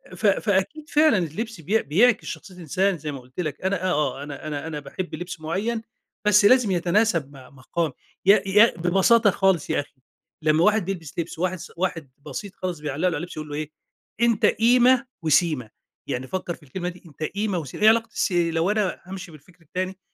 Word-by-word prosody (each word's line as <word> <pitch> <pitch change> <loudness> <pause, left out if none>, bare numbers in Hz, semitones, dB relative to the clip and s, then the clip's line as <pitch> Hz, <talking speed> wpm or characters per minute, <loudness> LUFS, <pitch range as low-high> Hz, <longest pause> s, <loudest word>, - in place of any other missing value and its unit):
ف 205 - -4
فأكيد 205 +10 0
فعلًا 300 -5 +4
اللبس 185 +4 -4
بي 210 +8 +1
بيعكس 220 - +3
شخصية 190 - -8
الإنسان 180 +3 0
زي 150 -1 -5
ما 140 - -6
قُلت 125 +5 -14
لك 155 -5 -3
أنا 190 -1 -1
آه، 150 -7 0
آه، - - -6
أنا 145 +1 -7
أنا 150 +1 -4
أنا 155 -2 -4
باحب 150 +6 -6
لبس 175 -1 -7
معين 205 +9 -2 0.5
بس 210 0 +6
لازم 245 -2 +5
يتناسب 175 -4 +1
مع 130 -2 -14
مقام 150 +4 -3 0.3
يا 200 +2 +6
يا 210 +1 +5
ببساطة 195 +6 +4
خالص 190 -5 +1
يا - - +1
أخي 140 -2 -8 0.4
لمّا 155 +1 +3
واحد 210 0 +3
بيلبس 170 -5 -5
لبس 165 -1 -4
وواحد 185 +1 0
س 175 - -10
واحد 165 -6 -2
بسيط 200 -1 -7
خالص 180 -3 -4
بيعلّق 145 -2 -4
له 185 - +3
على 175 - 0
اللبس 175 -2 -7
يقول 155 -1 -6
له 145 - -5
إيه، 155 0 -4 0.5
أنت 235 -3 +3
قيمة 245 +3 +4 0.2
وسيمة، 155 -6 +2 0.4
يعني 130 +1 -3
فكّر 180 +1 -3
في - - -22
الكلمة 175 +6 -4
دي 180 0 -13
أنت 155 -1 -9
قيمة 200 +3 -1
وسي 140 -5 -8
إيه 215 - +6
علاقة 230 +1 +3
السي 175 -3 +1
لو 165 +4 +1
أنا 210 -3 -1
هامشي 185 -2 -8
بالفكر 165 +4 -18
التاني 185 +4 -4
180 Hz, 200 wpm, -24 LUFS, 155-205 Hz, 0.5 s, بس